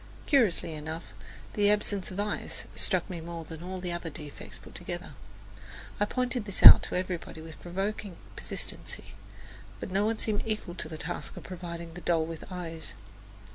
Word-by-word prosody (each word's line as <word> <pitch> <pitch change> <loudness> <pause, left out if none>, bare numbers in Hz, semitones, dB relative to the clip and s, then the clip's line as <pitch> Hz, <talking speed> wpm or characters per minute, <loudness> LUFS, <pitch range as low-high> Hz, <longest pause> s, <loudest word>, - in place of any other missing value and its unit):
Curiously 225 - +4
enough, 160 +2 -5 0.5
the 205 -1 +4
absence 205 -2 +2
of 185 - -5
eyes 205 0 -2
struck - - +1
me 175 -4 -5
more 165 0 -6
than 160 0 -8
all 185 +1 -4
the 180 -1 -3
other 170 -1 -3
defects 150 -1 -9
put - - -14
together. - - -6 0.9
I 205 - +4
pointed 250 0 -1
this 200 -2 -3
out - - +14
to - - -2
everybody 180 -3 -3
with 160 0 -10
provoking 195 +2 -3 0.2
persistency, - - -4 0.7
but - - -5
no 200 +3 +3
one 225 0 +1
seemed 215 -2 0
equal 215 -5 -2
to 155 -3 -5
the 160 - -5
task 165 +3 -4
of - - -7
providing 170 -2 -6
the 175 - -8
doll 165 -2 +3
with 165 -1 -6
eyes. 165 -3 -6
180 Hz, 175 wpm, -30 LUFS, 165-205 Hz, 0.9 s, out